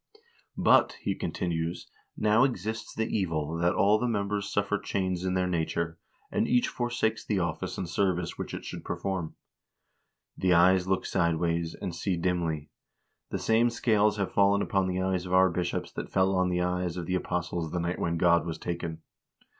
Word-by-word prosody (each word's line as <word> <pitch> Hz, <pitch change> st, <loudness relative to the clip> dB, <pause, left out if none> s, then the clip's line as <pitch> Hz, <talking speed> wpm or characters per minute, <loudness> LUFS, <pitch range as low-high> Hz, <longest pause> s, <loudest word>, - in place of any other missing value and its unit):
"But," -, -, +5 dB
he 100 Hz, -, 0 dB
continues, 85 Hz, -1 st, -3 dB, 0.3 s
"now 110 Hz, +3 st, +4 dB
exists 110 Hz, -3 st, -2 dB
the 110 Hz, -, 0 dB
evil, 80 Hz, -7 st, -1 dB
that 85 Hz, +2 st, +2 dB
all 100 Hz, +3 st, +4 dB
the 125 Hz, -, 0 dB
members 100 Hz, -2 st, -1 dB
suffer 100 Hz, 0 st, 0 dB
change 95 Hz, -2 st, -2 dB
in 95 Hz, 0 st, 0 dB
their 90 Hz, 0 st, +2 dB
nature, 85 Hz, -1 st, -2 dB, 0.3 s
and -, -, +1 dB
each 125 Hz, -1 st, +3 dB
forsakes 120 Hz, -2 st, -1 dB
the 105 Hz, -, -1 dB
office 85 Hz, -2 st, -2 dB
and 95 Hz, -, -3 dB
ser 95 Hz, +2 st, +1 dB
vice 85 Hz, -1 st, -4 dB
which -, -, -5 dB
it -, -, -7 dB
should -, -, -7 dB
perform. 95 Hz, -4 st, -3 dB, 1.0 s
The 90 Hz, -1 st, +2 dB
eyes 90 Hz, +1 st, +5 dB
look 95 Hz, 0 st, 0 dB
sideways, 85 Hz, 0 st, 0 dB
and 95 Hz, -4 st, -4 dB
see 90 Hz, +1 st, -1 dB
dimly. 85 Hz, -4 st, -1 dB, 0.6 s
The -, -, -2 dB
same 115 Hz, +2 st, +3 dB
scales 105 Hz, -3 st, +2 dB
have 100 Hz, -2 st, -2 dB
fallen 100 Hz, 0 st, +4 dB
upon 95 Hz, -2 st, +1 dB
the 90 Hz, 0 st, -1 dB
eyes 95 Hz, -1 st, -1 dB
of 90 Hz, -, -4 dB
our 95 Hz, 0 st, +5 dB
bishops 85 Hz, 0 st, -2 dB
that -, -, -6 dB
fell 95 Hz, 0 st, +2 dB
on 90 Hz, 0 st, +2 dB
the 90 Hz, 0 st, 0 dB
eyes 90 Hz, -1 st, -1 dB
of 85 Hz, -, -3 dB
the 90 Hz, -, -2 dB
apostles 85 Hz, -2 st, -2 dB
the 90 Hz, -, -1 dB
night 85 Hz, +1 st, -2 dB
when 85 Hz, 0 st, 0 dB
God 85 Hz, 0 st, +4 dB
was 85 Hz, -1 st, -4 dB
taken. 85 Hz, -2 st, -5 dB
90 Hz, 185 wpm, -28 LUFS, 85-100 Hz, 1.0 s, But